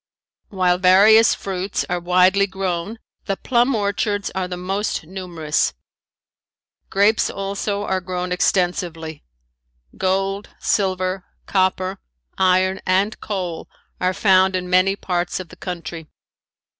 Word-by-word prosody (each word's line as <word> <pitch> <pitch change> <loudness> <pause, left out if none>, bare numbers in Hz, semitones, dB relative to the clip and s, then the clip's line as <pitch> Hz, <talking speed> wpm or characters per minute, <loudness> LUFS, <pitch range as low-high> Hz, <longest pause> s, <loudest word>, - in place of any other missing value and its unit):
While 180 -2 +1
various 205 +5 +6
fruits 190 0 -3
are 180 0 -1
widely 185 +3 +3
grown 190 +2 -3 0.3
the 195 -2 -2
plum 245 +1 +2
orchards 205 0 -1
are 190 -1 -2
the 180 0 -5
most 195 +3 -2
numerous. 170 -3 -2 1.1
Grapes 205 +3 +3
also 200 +1 -3
are 190 -2 -1
grown 180 0 -4
extensively. 175 -4 -1 0.7
Gold, 195 +2 -1
silver, 185 -1 0 0.2
copper, 190 0 0 0.4
iron 185 0 +2
and 195 +3 +1
coal 180 -5 -4 0.3
are 185 - +1
found 190 -2 +4
in 180 -1 -2
many 185 +2 +4
parts 175 -3 -2
of 185 -3 -8
the - - -13
country. 170 -3 -6
185 Hz, 115 wpm, -21 LUFS, 180-195 Hz, 1.1 s, various